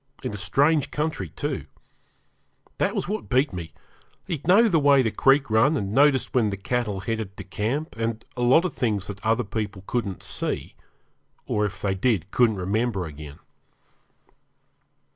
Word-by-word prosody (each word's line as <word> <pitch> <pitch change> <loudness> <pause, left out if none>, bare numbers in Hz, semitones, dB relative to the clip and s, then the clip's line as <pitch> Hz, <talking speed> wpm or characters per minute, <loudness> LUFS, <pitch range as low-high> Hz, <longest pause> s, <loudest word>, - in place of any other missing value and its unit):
In - - -3
a - - -4
strange 140 +10 +2
country, 155 +1 -2
too. 140 - -4 1.1
That - - +1
was - - -2
what 215 +3 -4
beat 130 -1 +2
me 85 -3 -6 0.5
he'd 160 -3 -5
know 210 +6 +6
the 170 -7 +3
way 140 -2 +5
the 110 - 0
creek 135 +4 +3
run, 135 +8 +4
and 100 -4 -3
noticed 140 +1 +3
when 120 -4 +3
the 100 - -4
cattle 105 -1 -2
headed 110 -3 -4
to - - -6
camp, 115 - -3
and 115 0 -3
a 125 - -4
lot 130 +8 +5
of 185 - -2
things 105 -5 -1
that 100 -1 -8
other 115 +2 +2
people 100 -2 -4
couldn't 100 -6 -3
see, - - -4 0.7
or 105 0 0
if 100 0 -10
they 100 -1 +1
did, 95 -3 0
couldn't 120 -3 +3
remember 100 +1 -1
again. 75 -1 -9
115 Hz, 165 wpm, -25 LUFS, 100-140 Hz, 1.1 s, know